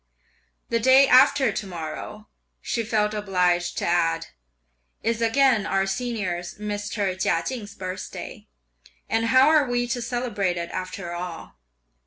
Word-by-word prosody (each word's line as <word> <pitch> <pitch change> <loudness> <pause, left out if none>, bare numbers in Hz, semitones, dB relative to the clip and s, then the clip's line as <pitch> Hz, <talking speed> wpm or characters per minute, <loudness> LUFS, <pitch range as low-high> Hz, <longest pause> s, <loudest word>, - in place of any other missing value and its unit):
"The 230 - +1
day 260 +4 +6
after 265 +1 +5
to 210 - -4
morrow," 175 +5 -7 0.3
she 230 - -2
felt 215 -1 0
obliged 180 -4 0
to - - -1
add, 170 -1 +1 0.8
"is 230 0 0
again 230 -2 +3
our 195 0 +1
senior's, 195 -5 -3
Mr. 205 -2 -3
Chia 165 -2 +1
Ching's 220 -6 -6
birthday, 185 0 -7 0.6
and 225 0 0
how 260 +4 +5
are 305 -3 +4
we 245 0 0
to 245 0 -2
celebrate 230 -7 -2
it 170 0 -4
after 185 -1 -5
all?" 175 - -7
210 Hz, 135 wpm, -24 LUFS, 180-240 Hz, 0.8 s, day